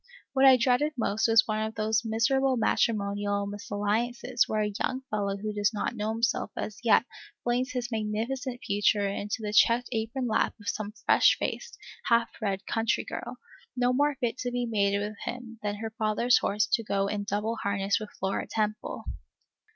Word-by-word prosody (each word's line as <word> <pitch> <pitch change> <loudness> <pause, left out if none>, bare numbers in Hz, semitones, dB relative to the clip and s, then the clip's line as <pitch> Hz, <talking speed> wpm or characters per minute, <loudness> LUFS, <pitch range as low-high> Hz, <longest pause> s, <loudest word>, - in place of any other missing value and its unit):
What 270 0 +4
I 260 -1 +8
dreaded 255 +5 +2
most 220 -1 +1
was 225 -1 +5
one 215 -1 -1
of 220 +1 -3
those 220 +1 +1
miserable 255 +4 +2
matrimonial 205 -2 +1
misalliances 210 +5 -1
where 215 -1 +1
a 210 0 -2
young 260 0 -2
fellow 200 -2 -1
who 210 +1 -4
does 210 +1 0
not 225 - -2
know 215 -1 -2
himself 230 +1 0
as 215 - -4
yet 230 0 +5 0.4
flings 250 +3 0
his 245 -1 -3
magnificent 230 +4 -3
future 205 -1 +2
into 205 +3 -3
the 210 0 -3
checked 235 +3 +4
apron 230 +3 -2
lap 220 - +1
of 205 - -13
some 210 -1 -2
fresh - - +5
faced, 485 -1 -4 0.3
half 235 0 +3
bred 195 -2 -2
country 225 0 0
girl, - - -6 0.4
no 250 0 +2
more 290 +2 +2
fit 240 +1 -1
to 245 - -2
be 245 0 -1
mated 200 -3 +1
with 215 0 -10
him 235 -2 -6
than 205 -1 -2
her 220 +1 -5
father's 220 +2 +2
horse 210 +2 +1
to - - +1
go 200 -2 0
in 205 0 -2
double 210 +3 -2
harness 200 0 0
with 215 -1 -7
Flora 190 +1 -2
Temple. 215 -1 -2
220 Hz, 180 wpm, -28 LUFS, 205-240 Hz, 0.4 s, I